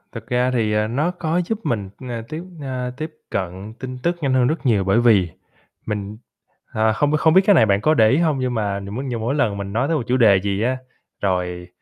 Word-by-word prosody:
Thực 115 Hz, -1 st, -9 dB
ra 125 Hz, +1 st, +1 dB
thì, 110 Hz, -3 st, +1 dB
à, 105 Hz, 0 st, +1 dB
nó 145 Hz, +10 st, 0 dB
có 175 Hz, -1 st, -1 dB
giúp 220 Hz, +3 st, -2 dB
mình, 105 Hz, -5 st, -2 dB
ừm, 130 Hz, -, -8 dB, 0.2 s
tiếp, 160 Hz, +2 st, -5 dB, 0.2 s
à, 130 Hz, -2 st, -3 dB
tiếp 155 Hz, +2 st, -5 dB, 0.2 s
cận 95 Hz, +3 st, -4 dB
tin 130 Hz, -1 st, -6 dB
tức 175 Hz, +1 st, +1 dB
nhanh 135 Hz, -3 st, +1 dB
hơn 125 Hz, -1 st, +3 dB
rất 155 Hz, +2 st, -2 dB
nhiều 110 Hz, -6 st, +3 dB
bởi 95 Hz, +4 st, +3 dB
vì 105 Hz, -7 st, +4 dB, 0.6 s
mình, 105 Hz, -1 st, -4 dB, 0.6 s
ờ, 110 Hz, 0 st, +2 dB
hông 145 Hz, +3 st, +1 dB
hông 160 Hz, 0 st, +4 dB
biết 190 Hz, -, +7 dB
cái 205 Hz, -, +6 dB
này 155 Hz, -, +6 dB
bạn 100 Hz, -1 st, +2 dB
có 155 Hz, -, +3 dB
để 110 Hz, -7 st, +5 dB
ý 130 Hz, -, +3 dB
hông, 155 Hz, -5 st, +1 dB
nhưng 130 Hz, -1 st, -1 dB
mà 100 Hz, -3 st, -1 dB
nh 100 Hz, -, -8 dB, 0.2 s
nhưng 120 Hz, -3 st, -3 dB
mà -, -, -5 dB
mỗi 135 Hz, +4 st, 0 dB
lần 120 Hz, -9 st, +1 dB
mình 100 Hz, 0 st, -5 dB
nói 120 Hz, +5 st, +1 dB
tới 165 Hz, 0 st, +1 dB
một 135 Hz, -, -2 dB
chủ 125 Hz, -, +2 dB
đề 105 Hz, -6 st, +5 dB
gì 100 Hz, 0 st, -1 dB
á, 130 Hz, +3 st, +1 dB, 0.4 s
rồi 90 Hz, -2 st, -1 dB
120 Hz, 250 wpm, -21 LUFS, 100-140 Hz, 0.6 s, biết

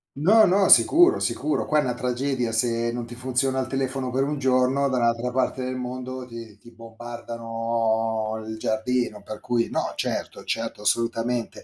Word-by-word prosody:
No, 205 Hz, +10 st, +5 dB
no, 190 Hz, +1 st, +3 dB
sicuro, 350 Hz, +4 st, +6 dB
sicuro, 310 Hz, -, -1 dB
qua 155 Hz, -, +2 dB
è -, -, +5 dB
una 125 Hz, -, -1 dB
tragedia 125 Hz, 0 st, -2 dB
se 115 Hz, +1 st, +1 dB
non 120 Hz, -1 st, -4 dB
ti 120 Hz, -, -10 dB
funziona 130 Hz, +2 st, 0 dB
il 130 Hz, -, -2 dB
telefono 135 Hz, -1 st, -2 dB
per 130 Hz, +2 st, 0 dB
1 145 Hz, 0 st, -2 dB
giorno, 130 Hz, +1 st, +2 dB
dall'altra 120 Hz, -1 st, +1 dB
parte 130 Hz, 0 st, -1 dB
del 130 Hz, 0 st, -3 dB
mondo 130 Hz, 0 st, -5 dB
ti 115 Hz, -3 st, -10 dB
ti 120 Hz, +3 st, -17 dB
bombardano 115 Hz, -1 st, -3 dB
il 110 Hz, 0 st, -5 dB
giardino; 110 Hz, 0 st, -1 dB
per 105 Hz, +1 st, -8 dB
cui 120 Hz, -1 st, -1 dB
no, -, -, -2 dB
certo -, -, -3 dB
certo, -, -, -3 dB
assolutamente. 115 Hz, +2 st, -1 dB
125 Hz, 165 wpm, -24 LUFS, 115-130 Hz, -, sicuro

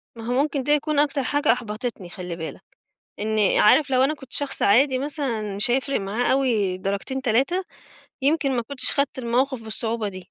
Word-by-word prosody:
ما 225 Hz, -1 st, -9 dB
هو 245 Hz, -, -1 dB
مُمكن 285 Hz, -2 st, -1 dB
ده 295 Hz, -, 0 dB
يكون 300 Hz, 0 st, +1 dB
أكتر 285 Hz, -1 st, +1 dB
حاجة 290 Hz, 0 st, +2 dB
أحبطِتني 225 Hz, -4 st, -4 dB
خلِّ 180 Hz, -2 st, -6 dB
بالك. 160 Hz, -1 st, -7 dB, 0.6 s
إني 215 Hz, -1 st, +2 dB
عارف 270 Hz, +6 st, +5 dB
لو 255 Hz, 0 st, +3 dB
أنا 280 Hz, +3 st, +2 dB
كنت 265 Hz, -3 st, -12 dB
شخص 285 Hz, -1 st, -2 dB
عادي 255 Hz, +5 st, +4 dB
مثلًا، 255 Hz, -8 st, -3 dB
مش 205 Hz, +4 st, 0 dB
هيفرق 270 Hz, +2 st, 0 dB
معاه 210 Hz, +5 st, -1 dB
أوي 225 Hz, -9 st, +1 dB
درجتين، 200 Hz, +8 st, -3 dB
3 270 Hz, +11 st, +1 dB, 0.6 s
يمكن 280 Hz, -1 st, +2 dB
ما 240 Hz, -, 0 dB
كُنتش 255 Hz, +2 st, -1 dB
خدّت 280 Hz, -2 st, -1 dB
الموقف 255 Hz, +1 st, 0 dB
بالصعوبة 220 Hz, 0 st, -1 dB
دي. 185 Hz, -2 st, -10 dB
250 Hz, 180 wpm, -23 LUFS, 215-275 Hz, 0.6 s, عارف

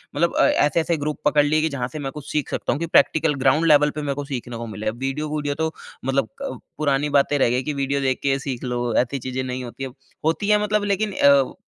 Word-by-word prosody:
मतलब 170 Hz, +3 st, +1 dB
अ, -, -, +4 dB
ऐसे-ऐसे 160 Hz, +2 st, +2 dB
ग्रुप 150 Hz, 0 st, -3 dB
पकड़ 150 Hz, 0 st, +4 dB
लिए 155 Hz, +1 st, +2 dB
कि 160 Hz, -, +1 dB
जहाँ 125 Hz, -1 st, -1 dB
से 155 Hz, -, -5 dB
मैं -, -, -4 dB
कुछ 150 Hz, -1 st, -9 dB
सीख 150 Hz, -2 st, -1 dB
सकता -, -, -1 dB
हूँ। 145 Hz, -, -3 dB
कि 170 Hz, -, -1 dB
प्रैक्टिकल 160 Hz, -1 st, +3 dB
ग्राउंड 150 Hz, +5 st, +4 dB
लेवल 150 Hz, -1 st, +6 dB
पे -, -, -2 dB
मैं 140 Hz, -2 st, -2 dB
को 145 Hz, 0 st, -4 dB
सीखने 125 Hz, -3 st, -5 dB
को 115 Hz, 0 st, -6 dB
मिले। 105 Hz, 0 st, -3 dB
वीडियो-वूडियो 145 Hz, +4 st, -3 dB
तो 160 Hz, 0 st, -1 dB, 0.3 s
मतलब 135 Hz, -3 st, 0 dB
अ, 275 Hz, -, -3 dB, 0.3 s
पुरानी 145 Hz, -1 st, +1 dB
बातें 145 Hz, +1 st, +1 dB
रह 125 Hz, -, +4 dB
गयी 125 Hz, +2 st, 0 dB
कि 150 Hz, -, -2 dB
वीडियो 140 Hz, 0 st, -1 dB
देख 130 Hz, -1 st, 0 dB
के 135 Hz, -1 st, +1 dB
सीख 135 Hz, -3 st, -5 dB
लो, 120 Hz, -2 st, -2 dB
ऐसी 130 Hz, +3 st, +1 dB
चीज़ें 130 Hz, +1 st, -3 dB
नहीं 130 Hz, 0 st, -4 dB
होती 125 Hz, +2 st, -7 dB
है। 135 Hz, -, -3 dB, 0.4 s
होती 165 Hz, +6 st, 0 dB
है 210 Hz, 0 st, +4 dB
मतलब 210 Hz, 0 st, +1 dB
लेकिन 205 Hz, +1 st, 0 dB
अ, 140 Hz, -4 st, +4 dB
140 Hz, 245 wpm, -22 LUFS, 130-155 Hz, 0.4 s, लेवल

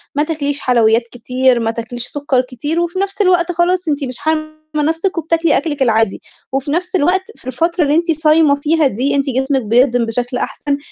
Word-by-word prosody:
ما 295 Hz, -, +2 dB
تاكليش 290 Hz, -3 st, -2 dB
حلويات 230 Hz, -3 st, +3 dB
كتير 250 Hz, 0 st, +1 dB
ما 225 Hz, -1 st, 0 dB
تاكليش 235 Hz, +1 st, -6 dB
سُكّر 285 Hz, -3 st, 0 dB
كتير، 265 Hz, +6 st, -4 dB
وفي 345 Hz, +2 st, -2 dB
نفْس 395 Hz, +1 st, -2 dB
الوقت 360 Hz, -2 st, +3 dB
خلاص 355 Hz, +1 st, 0 dB
أنتِ 290 Hz, -1 st, -1 dB
مش 255 Hz, -2 st, -4 dB
حارمة 310 Hz, +1 st, -1 dB, 0.2 s
نفسِك 325 Hz, +5 st, 0 dB
وبتاكلي 330 Hz, -1 st, +1 dB
أكلِك 290 Hz, -2 st, -3 dB
العادي، 225 Hz, -4 st, +2 dB, 0.3 s
وفي 270 Hz, +1 st, -2 dB
نفْس 355 Hz, +4 st, -1 dB
الوقت 365 Hz, +3 st, +2 dB
في -, -, -17 dB
الفترة 335 Hz, +7 st, 0 dB
اللي 290 Hz, 0 st, +2 dB
أنتِ 335 Hz, +1 st, +2 dB
صايمة 310 Hz, -1 st, +3 dB
فيها 300 Hz, +1 st, +2 dB
دي 265 Hz, +4 st, -1 dB
أنتِ 275 Hz, -1 st, +1 dB
جسمِك 265 Hz, +1 st, 0 dB
بيهضم 240 Hz, +2 st, +2 dB
بشكل 245 Hz, +2 st, -2 dB
أحسن، 285 Hz, -1 st, -2 dB
290 Hz, 185 wpm, -16 LUFS, 250-330 Hz, 0.3 s, حلويات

